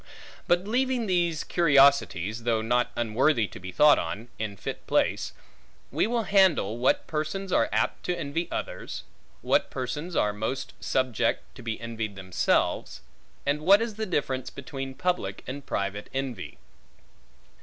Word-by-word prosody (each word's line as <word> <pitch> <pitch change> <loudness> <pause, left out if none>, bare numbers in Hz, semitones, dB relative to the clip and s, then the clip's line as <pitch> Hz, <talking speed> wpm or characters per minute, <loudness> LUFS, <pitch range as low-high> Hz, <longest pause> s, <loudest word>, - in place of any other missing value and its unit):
But 175 +1 +3
leaving 250 +1 +1
these 175 -5 +1
curiosities 140 - +3
(though 115 -1 +1
not 120 +2 +2
unworthy 120 +2 +2
to - - -10
be 95 0 -7
thought 150 +10 +6
on, 100 +8 -5
in 105 -2 -3
fit - - -6
place), - - +1 0.6
we - - +1
will 235 0 0
handle, 185 - +3
what 125 - +2
persons 165 +5 -3
are - - +3
apt - - 0
to 180 - 0
envy 165 +2 -2
others; - - -5 0.4
what - - +2
persons 150 +7 -4
are 105 0 +2
most 110 +6 -3
subject 120 -3 0
to 125 - -12
be 115 -2 -4
envied 115 -3 -4
themselves; 95 -2 0 0.4
and 145 +2 +1
what 195 +6 +7
is 230 -1 -2
the 220 +1 -4
difference 135 -7 -1
between 135 -1 -7
public 175 - -1
and 140 +2 -7
private 100 +1 -3
envy. 130 -7 -4
135 Hz, 145 wpm, -27 LUFS, 110-175 Hz, 0.6 s, what